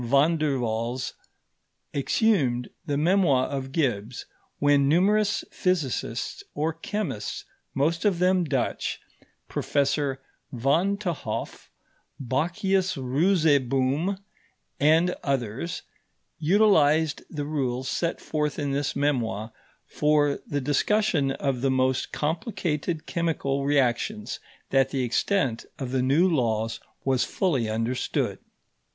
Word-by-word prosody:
Van 140 +7 +3
der 150 -4 0
Waals 120 +2 -2 0.8
exhumed 140 - +1 0.2
the 145 -1 0
memoir 155 -5 +3
of 135 -2 -4
Gibbs, 125 -6 -1 0.3
when 145 -1 +3
numerous 205 +6 +3
physicists 135 - -1
or 155 +2 0
chemists, 165 - -4 0.3
most 160 +5 +1
of 200 -4 +2
them 180 +1 +3
Dutch 135 -6 -1 0.5
Professor 140 -1 0 0.3
Van 155 +11 +1
t'Hoff, 180 -6 -4 0.5
Bakhius 180 - 0
Roozeboom, 145 +2 +2 0.6
and 160 +5 +4
others 135 +3 -2 0.6
utilized 160 -4 +4
the 145 -3 -4
rules 130 -4 -2
set 170 +4 -1
forth 150 -2 -2
in 145 -2 -1
this 140 +1 -1
memoir 115 -7 -1 0.3
for 150 -1 +2
the 145 -1 -1
discussion 145 +2 +2
of 135 -3 -2
the 135 - +2
most 130 0 +1
complicated 160 - -2
chemical 150 -5 -1
reactions, 145 - 0 0.3
that 135 -1 +3
the 135 -1 -1
extent 125 - 0
of 130 -3 -4
the 130 -1 +1
new 140 +8 +4
laws 115 -8 0 0.3
was 130 -2 +2
fully 135 - 0
understood. 115 +3 -1
145 Hz, 105 wpm, -26 LUFS, 130-170 Hz, 0.8 s, and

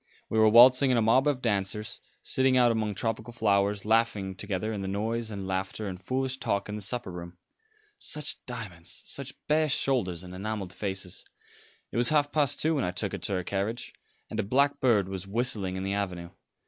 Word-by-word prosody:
We 110 - +1
were 110 0 +6
waltzing 125 +4 +8
in 125 - +3
a - - +3
mob 130 +6 +4
of 140 -3 0
dancers, 105 -1 -1 0.2
sitting 130 0 +4
out 120 -1 +5
among 110 -2 -1
tropical 115 +2 -3
flowers, 100 -3 +1
laughing 110 -3 +1
together 100 +2 -3
in 100 - -4
the 95 - -4
noise 110 +4 -2
and 100 -3 -5
laughter 95 +3 -3
and 95 -1 -6
foolish 130 +4 -1
talk 100 -5 -1
in 105 - -5
the 105 - -5
supper 120 0 -3
room. 85 0 -8 0.6
Such 150 -1 -1
diamonds; 100 -9 -6
such 135 -1 -4
bare 155 +1 +2
shoulders 95 -11 0
and 90 0 -10
enamelled 100 -1 -4
faces. 95 -3 -2 0.7
It - - -4
was 120 0 +4
half 145 -1 +2
past 145 -2 +1
two 160 +1 +2
when 140 - 0
I - - 0
took 90 +2 -2
her - - -4
to 100 - -1
her 90 -1 -1
carriage, 100 +6 -3 0.3
and - - -5
a - - +2
blackbird 125 -3 +2
was 95 0 -6
whistling 100 -3 0
in 95 - -3
the 100 +1 -1
avenue. 90 -4 -3
105 Hz, 200 wpm, -28 LUFS, 95-125 Hz, 0.7 s, waltzing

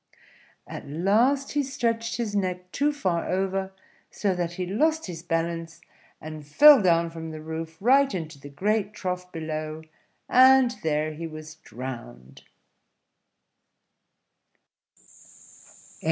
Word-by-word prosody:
At - - -9
last 225 - +2
he 295 - +1
stretched 230 -4 -2
his 220 -4 -3
neck 180 -2 -2
too 290 +1 +1
far 185 - -2
over, 190 +1 -1 0.4
so 200 -2 -1
that 175 -1 -3
he 180 +1 -3
lost 310 - +1
his 170 -3 -7
balance, 165 -1 -3 0.4
and 155 -1 -8
fell 275 - +7
down 170 -2 +2
from 165 -1 -7
the 155 -1 -7
roof, 160 +1 -6
right 270 +6 +4
into 160 -5 -5
the 145 - -11
great 210 +7 -1
trough 180 -2 -4
below, 155 -1 -5 0.4
and 260 -1 +6
there 155 0 -1
he 165 +2 -6
was 155 -1 -9
drowned. 110 - -9
180 Hz, 120 wpm, -26 LUFS, 160-220 Hz, 0.4 s, fell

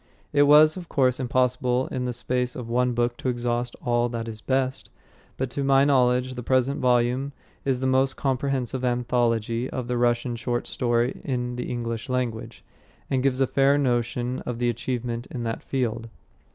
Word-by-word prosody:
It 145 0 +5
was, 155 +3 +7
of 175 -2 -8
course, 130 -2 +2
impossible 125 0 +1
in 125 -1 -2
the 125 - -1
space 125 +1 -2
of 125 -3 -6
one 125 +1 +1
book 120 0 0
to 130 - -2
exhaust 120 0 -2
all 120 0 +2
that 115 -1 -4
is 110 -1 -7
best. 130 0 -1 0.5
But 130 -1 -2
to 140 - -2
my 135 0 +4
knowledge, 125 -2 +3
the 125 - -6
present 130 +3 +1
volume 125 +2 +1 0.3
is 130 -2 0
the - - -1
most 130 +1 +2
comprehensive 130 -2 -1
anthology 120 -1 0
of 125 -2 -4
the 125 -1 -1
Russian 120 0 +1
short 120 0 -2
story 120 0 0
in 125 -2 -2
the 125 - -4
English 115 -1 -4
language, 125 -3 -3 0.5
and 130 -1 +2
gives 135 0 +1
a - - +5
fair 140 +2 +3
notion 125 -1 0
of 125 -2 -5
the 120 0 +1
achievement 120 0 -3
in 120 - -5
that 115 -1 -3
field. 115 -3 -2
125 Hz, 180 wpm, -25 LUFS, 120-130 Hz, 0.5 s, was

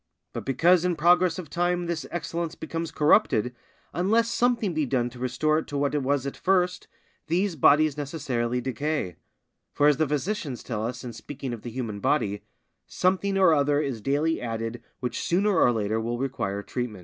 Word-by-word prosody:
But - - -6
because 170 +6 +4
in 180 -1 +1
progress 175 +1 +4
of 180 -4 -6
time 175 +3 0
this 170 -2 -3
excellence 170 -1 -3
becomes 165 +1 -4
corrupted, 135 - +3 0.4
unless 225 +6 +2
something 235 -7 +1
be 155 -3 0
done 120 -1 0
to 125 - -12
restore 130 +5 +1
it - - -7
to 145 - -4
what 140 0 0
it 145 - +1
was 140 0 0
at 140 - -4
first, 180 -1 +1 0.4
these 180 +3 0
bodies 150 +1 +4
necessarily 125 -5 -2
decay; 135 - -2 0.6
for 145 - +2
as 150 -1 +5
the 155 -1 +1
physicians 150 - -2
tell 110 -3 -3
us 120 +3 -4
in 120 -2 -6
speaking 130 +2 -6
of 115 - -7
the 120 - -6
human 115 -4 -4
body, 100 -4 0 0.5
"_Something 195 +2 +1
or 185 -4 +6
other 145 -1 +2
is 135 -7 -2
daily 145 +7 0
added 115 0 -4 0.2
which 125 -2 -3
sooner 195 +3 +1
or 125 - +5
later 110 -1 -1
will 120 +1 -2
require 110 -7 -3
treatment. 120 -5 -4
145 Hz, 185 wpm, -26 LUFS, 125-170 Hz, 0.6 s, or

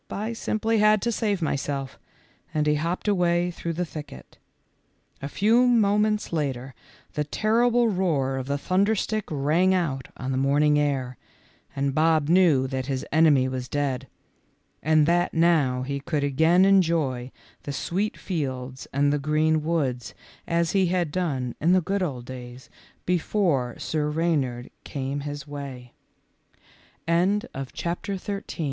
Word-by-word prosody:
I 215 +3 -3
simply 225 0 0
had 215 0 +5
to 235 - +1
save 205 -5 -1
my 155 - 0
self," 135 -1 -4 0.6
and 150 -1 +1
he 150 - +3
hopped 165 +7 -2
away 175 -3 +2
through 170 -1 -4
the 175 +2 -2
thicket. 150 - -10 0.8
A 140 - -4
few 230 - +3
moments 210 -3 +2
later 135 -4 -2 0.4
the 150 - -1
terrible 235 +8 +2
roar 160 -10 0
of 130 0 -4
the 140 0 0
thunderstick 205 +5 0
rang 160 +6 +2
out 140 -8 -2
on 130 0 -4
the 130 - 0
morning 150 +2 +3
air, 135 -4 -1 0.6
and 140 0 0
Bob 155 0 +2
knew 170 -7 +4
that 130 -1 -3
his 135 -2 -2
enemy 150 -4 +4
was 130 -1 -4
dead, 135 -2 -2 0.7
and 155 0 +4
that 175 +2 +1
now 155 -7 +3
he 140 +1 -3
could 145 +1 -2
again 160 +6 +4
enjoy 160 -10 +2 0.3
the 145 - -5
sweet 190 +9 -2
fields 130 -7 -4
and 145 +1 +2
the 145 - 0
green 155 +2 +1
woods 140 -7 -2 0.3
as 170 0 +1
he 190 -2 +2
had 175 -3 0
done 140 -9 -2
in 170 +4 +4
the 185 - +5
good 195 +3 -2
old 130 -9 -3
days 125 0 -10 0.3
before 170 - 0
Sir 150 -1 -2
Re 165 +3 0
155 Hz, 135 wpm, -25 LUFS, 135-185 Hz, 0.8 s, had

